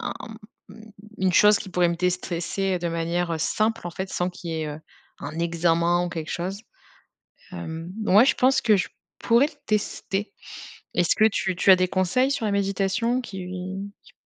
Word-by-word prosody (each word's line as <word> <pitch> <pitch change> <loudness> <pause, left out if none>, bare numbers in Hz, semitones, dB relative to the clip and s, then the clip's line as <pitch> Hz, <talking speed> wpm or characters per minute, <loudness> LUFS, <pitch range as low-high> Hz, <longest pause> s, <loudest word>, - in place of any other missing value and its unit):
un - - -3 1.1
une 185 -1 +2
chose 210 +3 +6
qui 205 - -8
pourrait 180 -1 +2
me 170 - -1
déstresser 180 +1 -1
de 175 0 -2
manière, 170 +1 -1
heu, 165 - -2
simple 215 +5 0
en - - -4
fait, 190 +3 -5
sans 180 - -1
qu'il 175 -1 -8
y - - -3
ait, - - -3
heu, 150 +1 -7 0.4
un 150 +3 -7
examen 170 +1 +2
ou - - -3
quelque 160 -2 -5
chose. 185 +3 -3 0.9
Hem, 170 -1 -6
ouais, 210 +4 +6
je - - +3
pense 260 +2 +3
que 220 -3 +4
je 180 - -1 0.3
pourrais 235 +5 +4
le 310 - -13
tester. 205 -1 -2 0.6
Est-ce 175 -2 +2
que 215 - +4
tu 190 -3 -1
tu 180 - +1
as - - +9
des 185 0 +1
conseils 185 +9 +1
sur 275 -5 -1
la 210 - 0
méditation 200 +5 0
qui 190 -6 -7 0.6
qui - - -20
185 Hz, 185 wpm, -24 LUFS, 170-210 Hz, 1.1 s, as